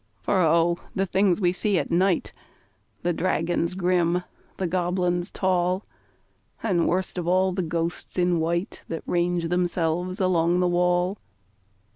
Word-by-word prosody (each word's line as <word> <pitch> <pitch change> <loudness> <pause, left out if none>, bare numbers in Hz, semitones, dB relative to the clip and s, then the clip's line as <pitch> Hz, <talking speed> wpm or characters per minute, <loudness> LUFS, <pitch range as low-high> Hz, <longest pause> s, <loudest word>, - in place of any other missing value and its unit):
For 190 -2 +2
O! 170 +1 +3 0.2
the 195 - +1
things 190 -1 +2
we 180 -3 +3
see 200 +1 +1
at - - -2
night 180 +1 +2 0.7
The 175 0 +1
dragons 170 0 0
grim, 180 -1 +1 0.3
the 190 - -1
goblins 180 0 0
tall, 185 0 0 0.8
And, 185 -7 +1
worst 185 +1 -1
of 170 - -4
all, 185 +1 +3
the 185 +1 -2
ghosts 170 +1 -3
in 175 -1 +2
white 170 +5 -2
That 165 - -5
range 175 -1 0
themselves 175 0 -1
along 175 -2 +2
the 180 - +2
wall! 180 +2 +1
180 Hz, 140 wpm, -25 LUFS, 170-185 Hz, 0.8 s, O